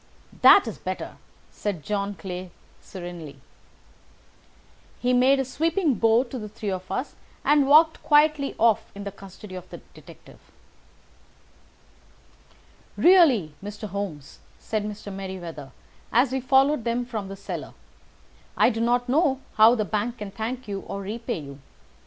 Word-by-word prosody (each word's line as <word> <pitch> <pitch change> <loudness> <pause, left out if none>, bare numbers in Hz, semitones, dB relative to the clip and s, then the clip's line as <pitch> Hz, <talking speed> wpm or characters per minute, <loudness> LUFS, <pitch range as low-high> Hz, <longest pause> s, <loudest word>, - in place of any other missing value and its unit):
"That - - +8
is - - -6
better," - - -5 0.3
said 195 -7 -4
John 205 -1 -2
Clay 185 -1 -7 0.3
serenely. 175 -6 -9 1.6
He 250 0 +1
made 260 +2 +4
a 270 - 0
sweeping 325 +4 0
bow 225 +1 +3
to 255 0 -7
the 210 -1 -7
three 210 -1 -5
of 185 0 -6
us 265 - -3 0.3
and 290 -2 +4
walked 315 +3 +5
quietly 295 -1 +3
off 225 -2 +2
in 200 - -7
the 200 - -5
custody 195 0 -12
of 185 -1 -9
the - - -8 0.2
detective. - - -16 2.6
"Really, 290 - +5
Mr. 210 +1 -6
Holmes," 180 -8 -6 0.2
said 215 -2 -3
Mr. 210 -1 -7
Merryweather 180 -7 -7 0.4
as 245 +2 +3
we 265 0 -1
followed 265 +1 +3
them 240 +1 -1
from 220 -5 -5
the 195 - -7
cellar, - - -7 0.8
"I - - +5
do 225 0 -3
not 245 +1 +1
know 270 0 +2 0.2
how 220 +2 +7
the 215 -3 -1
bank 215 +6 -2
can 210 -2 -7
thank 230 +4 -5
you 200 -1 -3
or 195 +2 -6
repay 230 +4 -4
you. 140 -1 -10
220 Hz, 145 wpm, -25 LUFS, 195-255 Hz, 2.6 s, That